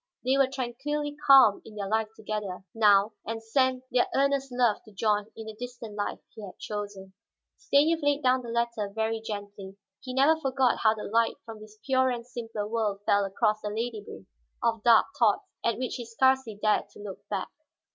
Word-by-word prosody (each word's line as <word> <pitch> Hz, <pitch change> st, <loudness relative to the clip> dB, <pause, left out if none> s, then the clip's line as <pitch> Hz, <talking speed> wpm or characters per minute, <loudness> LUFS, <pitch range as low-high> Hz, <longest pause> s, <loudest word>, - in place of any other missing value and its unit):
They 260 Hz, +1 st, +3 dB
were 275 Hz, -1 st, +4 dB
tranquilly 270 Hz, +3 st, -3 dB
calm 265 Hz, -7 st, +7 dB
in 215 Hz, -, -13 dB
their 200 Hz, -2 st, -4 dB
life 220 Hz, +1 st, +1 dB
together, 210 Hz, -4 st, -5 dB
now, 210 Hz, -1 st, +4 dB
and 225 Hz, 0 st, -5 dB
sent 255 Hz, +2 st, +1 dB
their 245 Hz, 0 st, +3 dB
earnest 275 Hz, -1 st, +1 dB
love 245 Hz, -4 st, +2 dB
to 215 Hz, -, -15 dB
John 210 Hz, 0 st, 0 dB
in 225 Hz, -, -7 dB
the 220 Hz, -, -7 dB
distant 240 Hz, -1 st, -8 dB
life 205 Hz, -1 st, -3 dB, 0.2 s
he 220 Hz, -, -10 dB
had 190 Hz, -, -10 dB
chosen. 205 Hz, -2 st, -6 dB, 0.4 s
Stanief 325 Hz, -4 st, +2 dB
laid 290 Hz, 0 st, +1 dB
down 255 Hz, 0 st, +3 dB
the 240 Hz, -, -8 dB
letter 235 Hz, -3 st, -1 dB
very 220 Hz, +1 st, -2 dB
gently. 205 Hz, -2 st, -7 dB, 0.2 s
He 255 Hz, -1 st, -7 dB
never 310 Hz, +4 st, +4 dB
forgot 265 Hz, -2 st, +1 dB
how 220 Hz, 0 st, +3 dB
the 210 Hz, -, -7 dB
light 230 Hz, +2 st, +1 dB
from 225 Hz, -1 st, -9 dB
this 215 Hz, 0 st, -14 dB
purer 260 Hz, -1 st, +3 dB
and 240 Hz, -2 st, -4 dB
simpler 225 Hz, -4 st, -5 dB
world 210 Hz, -3 st, -1 dB
fell 200 Hz, 0 st, +3 dB
across 210 Hz, +2 st, 0 dB
the -, -, -4 dB
labyrinth 215 Hz, -, -5 dB, 0.4 s
of 230 Hz, -2 st, +1 dB
dark 230 Hz, -1 st, +6 dB
thoughts 235 Hz, -, +3 dB, 0.2 s
at 230 Hz, -, +1 dB
which 255 Hz, 0 st, -3 dB
he 240 Hz, -, -6 dB
scarcely 260 Hz, -1 st, +2 dB
dared 215 Hz, 0 st, +2 dB
look 205 Hz, -2 st, -8 dB
back. -, -, -3 dB
225 Hz, 185 wpm, -27 LUFS, 210-260 Hz, 0.4 s, calm